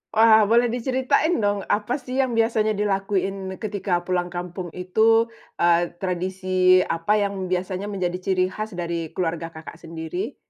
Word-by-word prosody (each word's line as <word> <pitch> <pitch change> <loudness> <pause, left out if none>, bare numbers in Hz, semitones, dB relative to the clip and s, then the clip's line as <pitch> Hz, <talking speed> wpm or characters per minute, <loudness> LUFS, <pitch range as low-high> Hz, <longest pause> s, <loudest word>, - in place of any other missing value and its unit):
Wah, 220 -1 +6
boleh 235 +2 +3
diceritain 260 +7 +1
dong 205 -1 0
apa 220 +7 0
sih 255 -1 -7
yang 255 - -2
biasanya 225 -1 +2
dilakuin 195 -2 -2
ketika 200 -4 -1
pulang 180 -1 -1
kampung 175 -1 -6
itu? 220 +5 +3 0.3
Eee, 170 0 +3
tradisi 185 0 +2
apa 180 +4 +1
yang 195 -2 -2
biasanya 185 +2 -2
menjadi 180 -3 -2
ciri 185 -1 +2
khas 215 +3 -6
dari 170 -3 -4
keluarga 165 -1 -3
Kakak 160 -1 -10
sendiri? 165 - -6
190 Hz, 145 wpm, -23 LUFS, 180-215 Hz, 0.3 s, Wah